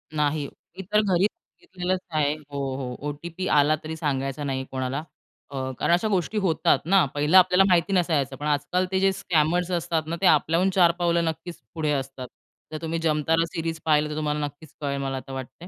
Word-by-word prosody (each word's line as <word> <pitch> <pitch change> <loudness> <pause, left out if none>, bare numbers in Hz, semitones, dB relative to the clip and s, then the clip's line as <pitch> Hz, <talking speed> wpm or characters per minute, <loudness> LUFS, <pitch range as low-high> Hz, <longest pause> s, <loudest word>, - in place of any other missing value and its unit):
नाही. 150 0 0 0.3
मी 190 - -4
तर 210 0 +5
घरी 190 -2 +2
सांगितलेलंच 185 -3 -4
आहे 150 -2 +1
हो, 150 -2 -17 0.2
हो. 125 -2 -5
ओ-टी-पी 170 +5 -5
आला 145 +2 +4
तरी 160 +1 -5
सांगायचा 135 -2 -2
नाही 130 -2 -2
कोणाला 130 +3 -3 0.5
अ, 130 -1 -4
कारण - - +2
अशा 175 +5 +2
गोष्टी 200 +1 -1
होतात 165 -4 +3
ना 195 -1 +6
पहिलं 150 +6 +4
आपल्याला 185 +1 +6
माहिती 180 +2 +3
नसायचं. 155 -8 +1
पण 145 +3 -7
आजकाल 150 +5 0
ते 190 - +1
जे 195 0 +3
स्कॅमर्स 175 -2 +1
असतात 170 -2 0
ना, 165 - -2
ते - - +2
आपल्याहून 165 +4 +3
चार 175 -3 +6
पावलं 170 -1 +2
नक्कीच 165 +2 -5 0.2
पुढे 155 -2 0
असतात. 135 -2 -4 0.4
जर 155 - -4
तुम्ही 165 0 -2
जमतारा 165 +1 +1
सीरीज 165 -2 -4
पाहिलं 150 -1 +3
तर 150 - -4
तुम्हाला 150 -1 -1
नक्कीच 145 +1 -11
कळेल 140 -1 -2
मला 135 -1 -2
आता 135 +1 -8
वाटतंय. 135 +6 -8
160 Hz, 190 wpm, -25 LUFS, 145-175 Hz, 0.5 s, ना